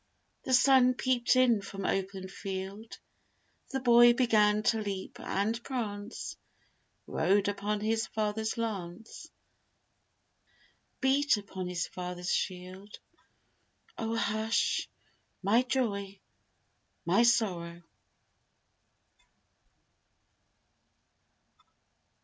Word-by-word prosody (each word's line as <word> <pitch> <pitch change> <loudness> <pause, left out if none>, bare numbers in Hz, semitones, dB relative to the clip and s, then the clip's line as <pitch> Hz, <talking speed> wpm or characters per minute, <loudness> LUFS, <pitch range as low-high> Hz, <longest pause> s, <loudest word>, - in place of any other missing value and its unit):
The 260 - -1
Sun 255 0 +5
peeped 250 -1 +1
in 245 -4 +4
from 195 0 -7
open 190 -1 -2
field, 195 +3 -7 0.7
The 270 - -2
boy 240 -1 +7
began 215 -4 +3
to 220 0 +2
leap 195 -2 -5
and 220 +4 -2
prance, 215 -4 -5 0.7
Rode 200 +1 +1
upon 205 +1 -2
his 225 +1 0
father's 220 +1 -2
lance, 210 -3 -5 1.7
Beat 275 -1 +3
upon 190 -3 -6
his 180 -1 -2
father's 180 0 -4
shield 185 +2 -4 1.0
'Oh 225 0 -3
hush, 220 +1 0 0.5
my 215 +5 +4
joy, 200 -7 -2 0.9
my - - +3
sorrow.' 180 -8 +1
210 Hz, 80 wpm, -30 LUFS, 195-235 Hz, 1.7 s, boy